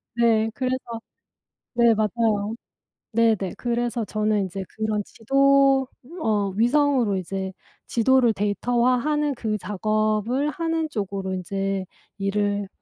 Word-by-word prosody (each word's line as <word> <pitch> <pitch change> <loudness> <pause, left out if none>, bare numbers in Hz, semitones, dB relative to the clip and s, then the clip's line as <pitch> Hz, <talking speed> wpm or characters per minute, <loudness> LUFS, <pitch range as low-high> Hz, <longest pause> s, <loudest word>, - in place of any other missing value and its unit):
네 225 -2 +3
그래서 255 -2 -3 0.7
네 235 -1 +5
맞아요. 215 0 0 0.6
네네. 220 -5 +2
그래서 240 -1 -1
저는 215 0 0
인제 190 +1 -5
그런 215 -1 -2
지도 275 +3 +3 0.3
어 205 -4 +1
위성으로 245 -3 +2
이제 190 +1 -4 0.4
지도를 240 0 +3
데이터화하는 250 +8 +1
그 215 -2 -2
작업을 215 +7 0
하는 325 0 -1
쪽으로 195 -6 -3
인제 195 +1 -2 0.3
일을 205 0 0
220 Hz, 235 characters per minute, -24 LUFS, 205-250 Hz, 0.7 s, 네